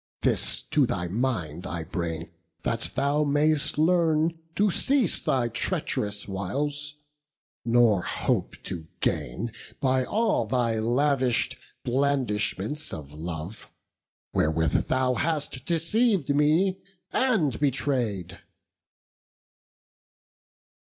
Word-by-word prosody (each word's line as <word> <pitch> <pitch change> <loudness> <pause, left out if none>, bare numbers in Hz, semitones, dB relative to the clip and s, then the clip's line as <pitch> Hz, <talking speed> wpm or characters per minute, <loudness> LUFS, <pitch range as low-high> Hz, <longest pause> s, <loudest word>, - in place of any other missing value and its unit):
This - - 0
to 145 -4 +4
thy 90 -5 -2
mind 90 - -2
I 85 -2 -3
bring, 85 0 -4 0.3
that 115 0 -1
thou 140 +3 +2
mayst 150 +1 +2
learn 165 0 +3 0.2
To 205 0 +3
cease 265 - +1
thy 125 -3 +1
treach'rous 105 -2 -2
wiles, 145 +10 -3 0.7
nor 115 -5 +4
hope - - -1
to 80 -3 -6
gain 100 - -1 0.3
By 130 -2 +2
all 210 - +1
thy 115 -1 +1
lavish'd 125 +2 +2 0.3
blandishments 130 -1 0
of 75 -2 -7
love, 80 +5 -6 0.6
Wherewith 80 +1 +2
thou 130 0 +2
hast 145 -3 -2
deceived 170 - +2
me, 160 +7 +3 0.3
and 195 - +2
betray'd." 125 - -1
130 Hz, 95 wpm, -27 LUFS, 105-150 Hz, 0.7 s, to